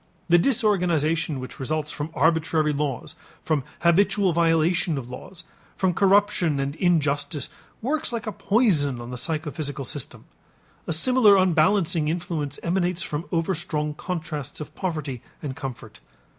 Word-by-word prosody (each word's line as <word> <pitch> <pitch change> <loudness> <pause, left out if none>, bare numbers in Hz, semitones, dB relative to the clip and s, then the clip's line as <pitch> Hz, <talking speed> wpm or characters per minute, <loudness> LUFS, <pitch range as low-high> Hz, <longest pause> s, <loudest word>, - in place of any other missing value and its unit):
The 175 +1 +6
disorganization 170 - +1
which 130 - -8
results 150 +2 -2
from 150 +1 -4
arbitrary 160 0 +2
laws, 145 +1 -3 0.3
from 155 -4 0 0.2
habitual 190 +2 +3
violation 165 0 +2
of 125 -2 -6
laws, 170 +7 -10 0.3
from 185 -2 +2
corruption 195 -6 +3
and 135 +1 -1
injustice 145 -5 0 0.3
works 295 +4 -1
like 230 -3 -3
a 215 - -2
poison 185 - +2
on 120 +1 -7
the 125 - -5
psychophysical 150 -2 -3
system. 145 +1 -5 0.6
A - - -1
similar 210 +4 +5
unbalancing 170 -2 +3
influence 155 -3 -3
emanates 180 0 0
from 150 +1 -4
overstrong 165 -3 -1
contrasts 155 -4 -5
of 150 - -8
poverty 150 -9 -3 0.2
and 135 -3 -4
comfort. 120 -7 -7
160 Hz, 130 wpm, -24 LUFS, 145-180 Hz, 0.6 s, The